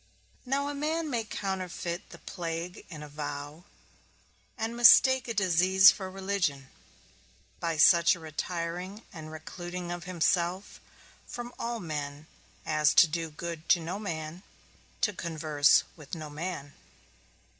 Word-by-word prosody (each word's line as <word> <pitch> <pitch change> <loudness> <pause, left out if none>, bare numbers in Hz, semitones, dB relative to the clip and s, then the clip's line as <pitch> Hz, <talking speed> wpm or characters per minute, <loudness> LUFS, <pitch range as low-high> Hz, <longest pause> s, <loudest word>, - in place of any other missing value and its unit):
Now 280 +2 0
a 290 - -3
man 310 +2 -2
may 235 -3 0
counterfeit 185 -4 -4
the - - -11
plague 170 0 -6
in 155 -4 -8
a - - -8
vow, 145 +2 -6 0.9
and 225 +1 -3
mistake 255 +2 +7
a 230 - -2
disease 190 0 +6
for 190 -2 -6
religion, 185 -8 -2 0.9
by 165 -2 -2
such 170 +2 +6
a - - -12
retiring 170 +5 -5
and 160 -3 -8
recluding 175 +2 -7
of 175 -1 -7
himself 180 +1 0 0.5
from 240 0 -7
all 235 0 -3
men 150 -3 -5 0.4
as 155 -1 +2
to - - +9
do 165 +1 -3
good 165 +1 -7
to 175 - +6
no 170 +4 -4
man, 165 -3 -5 0.6
to 215 -4 +2
converse 155 -4 +2
with 150 0 -8
no 155 -2 -7
man. 150 -2 -5
175 Hz, 135 wpm, -29 LUFS, 155-195 Hz, 0.9 s, to